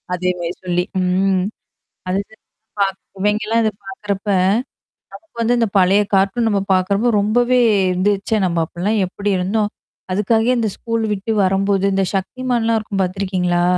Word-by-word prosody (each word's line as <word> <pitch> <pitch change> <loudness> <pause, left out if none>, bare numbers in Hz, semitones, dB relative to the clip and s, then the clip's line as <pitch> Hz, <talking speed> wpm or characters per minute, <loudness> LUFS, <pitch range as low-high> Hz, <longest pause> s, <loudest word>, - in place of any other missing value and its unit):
அதேமாரி 180 -1 -2
சொல்லி. 180 0 +1 0.2
ம். 185 +1 +1 0.7
அதுதா 200 +3 -3 0.4
பாக் 195 -1 0 0.2
இவைங்கலாம் 215 +3 +1
இத 215 - +2 0.2
பாக்கறப்ப. 200 +1 -5 0.8
நமக்கு 330 -6 -15
வந்து 240 +2 +2
இந்த 230 - +2
பழைய 190 +3 +4
காார்டும் 195 +4 +2
நம்ம 200 -2 +1
பாக்கறப்போ 200 +5 +1
ரொம்பவே 245 +4 +2 0.3
இருந்துச்சே 200 +3 0
நம்ம 170 -1 -1
அப்பலாம் 205 +7 -1
எப்படி 200 +2 -3
இருந்தோம். 205 +3 0 0.4
அதுக்காகே 225 +5 +2
இந்த 225 -2 +1
ஸ்கூல் 230 -1 -2
விட்டு 205 +3 -2
வரும்போது, 195 +1 +1
இந்த 195 0 +2
சக்திமான்லாம் 230 +2 0
இருக்கும் 200 -2 -2
பார்த்துருக்கீங்களா? 180 -2 0
200 Hz, 130 wpm, -19 LUFS, 185-220 Hz, 0.8 s, பழைய